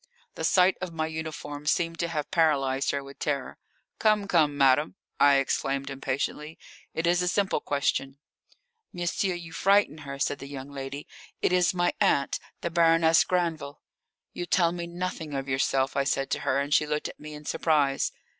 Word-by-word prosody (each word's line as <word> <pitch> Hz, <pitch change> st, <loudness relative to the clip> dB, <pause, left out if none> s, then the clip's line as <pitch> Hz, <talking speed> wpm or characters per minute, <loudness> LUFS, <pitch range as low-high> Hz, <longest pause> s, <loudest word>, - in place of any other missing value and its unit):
The -, -, -6 dB
sight 185 Hz, 0 st, +4 dB
of 185 Hz, -2 st, -4 dB
my 160 Hz, -1 st, -2 dB
uniform 155 Hz, -2 st, -6 dB
seemed 165 Hz, +1 st, 0 dB
to 170 Hz, -, 0 dB
have 150 Hz, -3 st, -4 dB
paralysed 140 Hz, -6 st, +2 dB
her 140 Hz, -1 st, -1 dB
with 140 Hz, 0 st, -13 dB
terror. 140 Hz, -3 st, -3 dB, 0.4 s
"Come, 215 Hz, -2 st, +2 dB
come, 155 Hz, -6 st, +2 dB
madame," 140 Hz, +4 st, +3 dB, 0.2 s
I 145 Hz, -1 st, +6 dB
exclaimed 135 Hz, 0 st, 0 dB
impatiently; 140 Hz, +3 st, -3 dB, 0.4 s
"it 165 Hz, -, -1 dB
is 175 Hz, +1 st, +3 dB
a 180 Hz, -, 0 dB
simple 195 Hz, -2 st, +1 dB
question." 140 Hz, -1 st, -1 dB, 0.7 s
"Monsieur, 175 Hz, +1 st, -1 dB
you 170 Hz, -2 st, -8 dB
frighten 195 Hz, -5 st, +3 dB
her," 140 Hz, -2 st, -7 dB
said 140 Hz, 0 st, -1 dB
the 135 Hz, -, -8 dB
young 140 Hz, 0 st, -8 dB
lady. 140 Hz, +1 st, -6 dB, 0.4 s
"It -, -, +2 dB
is 180 Hz, 0 st, +3 dB
my 175 Hz, 0 st, +1 dB
aunt, 140 Hz, -1 st, +2 dB, 0.2 s
the 170 Hz, -, -3 dB
Baroness 165 Hz, -1 st, +5 dB
Granville." 165 Hz, -5 st, -2 dB, 0.5 s
"You 175 Hz, -, -5 dB
tell 170 Hz, -2 st, +3 dB
me 170 Hz, 0 st, -5 dB
nothing 170 Hz, -4 st, -5 dB
of 135 Hz, 0 st, -3 dB
yourself," 135 Hz, 0 st, 0 dB
I 140 Hz, -, +2 dB
said 135 Hz, 0 st, -1 dB
to -, -, 0 dB
her, 135 Hz, -, 0 dB
and 140 Hz, +1 st, -1 dB
she 150 Hz, -, +3 dB
looked 150 Hz, 0 st, -1 dB
at -, -, -11 dB
me 150 Hz, 0 st, -9 dB
in 150 Hz, 0 st, -11 dB
surprise. 145 Hz, -4 st, +1 dB
150 Hz, 180 wpm, -27 LUFS, 140-170 Hz, 0.7 s, I